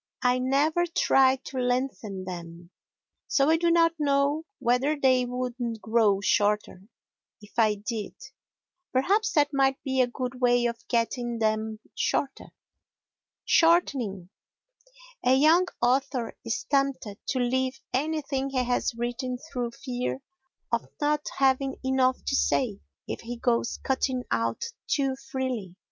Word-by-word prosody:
I 250 0 +3
never 295 +7 +2
try 265 -5 +4
to 260 - -5
lengthen 245 -6 -2
them, 170 -1 -8 0.6
so 280 +2 +3
I 325 - +4
do 340 +1 +2
not 335 0 +4
know 285 +2 +1
whether 265 +4 +1
they 255 -2 +3
would 250 0 -3 0.3
grow 215 -3 +2
shorter 205 -2 +1 0.6
if 210 -1 -16
I 215 -2 +4
did. 210 +1 -5 0.8
Perhaps 405 - +2
that 290 -1 +3
might 270 -1 +2
be 265 -1 +1
a 250 - +3
good 250 +1 -5
way 245 -1 +3
of 235 -1 -3
getting 240 0 -1
them 220 0 0 0.2
shorter. 275 -1 -1 1.0
Shortening 255 - +2 0.9
A 250 +1 +5
young 320 +6 +5 0.2
author 255 -1 +1
is 230 +4 -2
tempted 275 -7 -1
to 260 - 0
leave 260 +1 0
anything 275 -1 -1
he 260 -2 0
has 245 -1 0
written 245 +2 -3 0.2
through 245 -2 -1
fear 250 +2 -4 0.5
of 235 -1 0
not 295 0 0
having 270 0 +2
enough 260 -1 +1
to 275 - 0
say 230 -7 +1 0.3
if - - -5
he 235 +1 -6
goes 235 -1 0
cutting 260 -1 0
out 115 0 0 0.2
too 270 -2 +1 0.2
freely. 250 -9 -3
255 Hz, 130 wpm, -27 LUFS, 235-275 Hz, 1.0 s, A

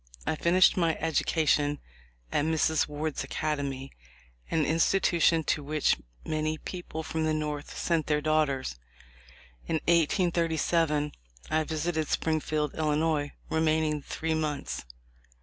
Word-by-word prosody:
I - - 0
finished 175 +4 +4
my 165 -3 +2
edu 165 -1 0
cation 145 -2 +2 0.5
at - - +1
Mrs. 160 0 +2
Ward's 150 +1 -3
Academy, 140 -3 -3 0.6
an 160 -2 +1
institution 165 0 +3
to 150 - 0
which 150 +1 +1 0.3
many 155 0 -1
people 165 -2 -6
from 160 0 -2
the 155 0 +1
North 150 -1 -4
sent 165 -3 0
their 150 -1 +2
daughters. 150 - 0 0.9
In - - 0
1837 165 -2 +2 0.4
I 155 0 +2
visited 160 0 -1
Springfield, 155 -2 0
Illinois, 150 -1 0 0.2
remaining 155 -1 +1
three 160 +3 -3
months. 150 - -2
155 Hz, 115 wpm, -28 LUFS, 150-160 Hz, 0.9 s, finished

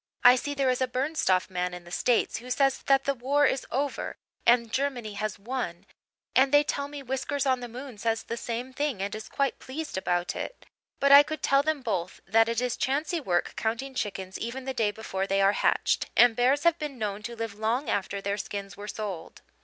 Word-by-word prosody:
"I 245 +1 +9
see 285 +3 -3
there 270 -2 +2
is 255 - -2
a 260 - +2
Bernstoff 255 - +1
man 180 -1 -2
in 175 - -9
the 175 - -14
States 240 +5 +1
who 245 +2 -9
says 270 +1 +2
that 270 -1 +4
the 280 - +1
war 275 +3 +2
is 265 -1 0
over 280 +2 -2 0.3
and 235 -1 +4
Germany 255 -6 -1
has 215 0 -3
won 200 -5 -4 0.5
and 265 +2 +5
they 290 0 +6
tell 280 -1 -2
me 285 -1 -8
Whiskers 265 +2 -2
on 260 -2 +2
the 245 - -6
moon 245 -1 -9
says 225 0 0
the 235 - -4
same 240 +2 -4
thing 285 -6 -1
and 200 +1 -3
is 215 0 -7
quite 275 -2 -1
pleased 285 -5 -5
about 175 -1 -1
it, - - -6 0.3
but 280 0 +4
I 280 +1 +11
could 310 +1 -5
tell 275 0 +4
them 300 -2 -1
both 185 -6 -2
that 225 +3 +4
it 230 +1 0
is 250 -1 -1
chancy 300 +6 0
work 175 -9 0
counting 235 +5 -2
chickens 195 -5 -4
even 255 +3 -5
the 265 - -2
day 225 -4 +1
before 200 -2 -3
they 195 0 +1
are 195 0 +5
hatched, - - +1
and 245 -2 +7
bears 260 +5 +3
have 340 -1 +3
been 295 -4 -5
known 210 -2 -3
to 235 +3 -6
live 225 -2 -4
long 235 +6 0
after 200 0 -1
their 200 +1 -1
skins 200 -2 -5
were 205 +1 -8
sold." 205 -6 -6
245 Hz, 220 wpm, -28 LUFS, 205-275 Hz, 0.5 s, I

